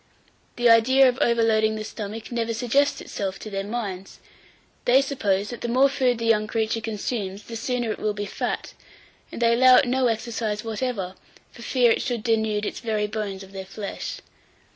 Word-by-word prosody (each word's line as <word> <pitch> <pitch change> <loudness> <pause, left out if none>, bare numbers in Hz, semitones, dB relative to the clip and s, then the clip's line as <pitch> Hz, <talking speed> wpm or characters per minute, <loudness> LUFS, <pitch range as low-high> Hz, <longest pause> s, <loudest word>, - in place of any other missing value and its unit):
The 240 0 +2
idea 255 +4 +6
of 250 0 0
overloading 220 -2 +3
the 215 - -4
stomach 215 +1 -7
never 230 -1 -1
suggests 275 +4 +1
itself 195 -1 -4
to 215 - -9
their 195 0 -2
minds. 200 -3 -5 0.7
They 250 +2 +6
suppose 210 -8 0
that 240 - -7
the - - -2
more 260 +4 +4
food 255 -3 +1
the 230 - -3
young 215 -2 +3
creature 225 0 -1
consumes, 210 -2 -4
the 230 - -8
sooner 240 0 -1
it - - -5
will 210 -1 -1
be 205 0 -3
fat, - - -4 0.6
and - - -7
they 235 -1 +4
allow 255 +1 +7
it 250 - +5
no 255 0 +2
exercise 225 -2 -2
whatever, 220 -4 -3 0.4
for - - -14
fear 245 -1 +3
it - - +1
should 240 -4 -2
denude 220 -2 +1
its - - -4
very 215 -3 -1
bones 205 -2 -4
of 190 - -14
their 195 -1 -6
flesh. 200 +1 -6
225 Hz, 185 wpm, -24 LUFS, 210-245 Hz, 0.7 s, allow